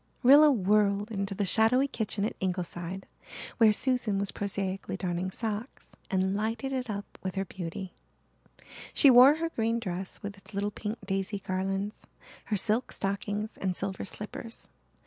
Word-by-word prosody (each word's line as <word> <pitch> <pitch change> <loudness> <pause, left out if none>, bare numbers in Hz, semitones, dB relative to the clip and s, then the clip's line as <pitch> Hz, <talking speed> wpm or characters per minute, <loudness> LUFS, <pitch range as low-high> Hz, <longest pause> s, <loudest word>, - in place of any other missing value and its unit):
Rilla 290 +4 +8
whirled 205 -1 +2
into 195 -1 -3
the 200 +1 0
shadowy 230 +7 +4
kitchen 215 -5 -2
at - - -2
Ingleside, 180 0 -3 0.5
where 225 -2 +7
Susan 240 -3 +1
was 200 0 -1
prosaically 195 -1 -3
darning 180 -1 -2
socks, 220 +4 -5
and 190 0 +1
lighted 225 +5 -2
it 255 -2 -2
up 200 -1 -6
with 185 0 -4
her 195 0 -1
beauty. 180 +1 -6 1.0
She 280 - +7
wore 255 +4 +9
her 330 +1 -2
green 230 -5 0
dress 185 -3 -5
with 200 0 -6
its 195 - -14
little 205 +1 -1
pink 210 +2 -4
daisy 195 +1 -1
garlands, 195 +2 -3 0.4
her 210 - 0
silk 220 +5 0
stockings 205 +2 -3
and 185 -2 -1
silver 190 0 -3
slippers. 210 +3 -6
205 Hz, 150 wpm, -29 LUFS, 190-225 Hz, 1.0 s, wore